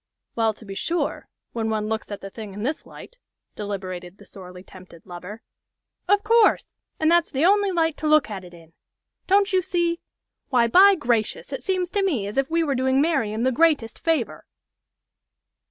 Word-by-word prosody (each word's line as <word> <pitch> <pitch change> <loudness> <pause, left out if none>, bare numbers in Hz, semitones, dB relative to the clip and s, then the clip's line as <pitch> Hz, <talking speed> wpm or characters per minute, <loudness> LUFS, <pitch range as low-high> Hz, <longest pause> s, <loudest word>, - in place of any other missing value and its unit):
"Well, 225 -2 +1
to 220 - -15
be 195 - -7
sure 335 - -2 0.2
when 225 -1 -2
one 215 -1 -1
looks 220 0 -3
at 205 -1 -7
the 195 - -8
thing 210 -3 -9
in 205 - -6
this 295 +6 -3
light," - - -13 0.4
deliberated 185 -3 -6
the - - -16
sorely 180 -1 -12
tempted 185 -3 -15
lover. 180 +5 -9 0.6
"Of 405 +2 +3
course! 455 0 +3 0.2
And 315 +1 +3
that's 345 -1 +3
the 275 +4 0
only 405 +1 +4
light 325 -3 0
to 310 - -3
look 305 -1 +4
at 200 -4 -7
it 180 - -12
in! 165 -1 -17 0.5
Don't 395 +1 +3
you 375 - +4
see? 345 -2 -1 0.5
Why, 245 -3 +3
by 385 +11 +6
gracious! 240 - -1
it - - -5
seems 370 -2 -1
to 405 - 0
me 285 - 0
as 205 +6 -2
if 270 - -1
we 330 0 +1
were 290 -3 0
doing 260 +1 +1
Marian 265 -8 0
the 260 - +2
greatest 290 -4 +1
favor." 255 - -1
255 Hz, 185 wpm, -23 LUFS, 205-335 Hz, 0.6 s, by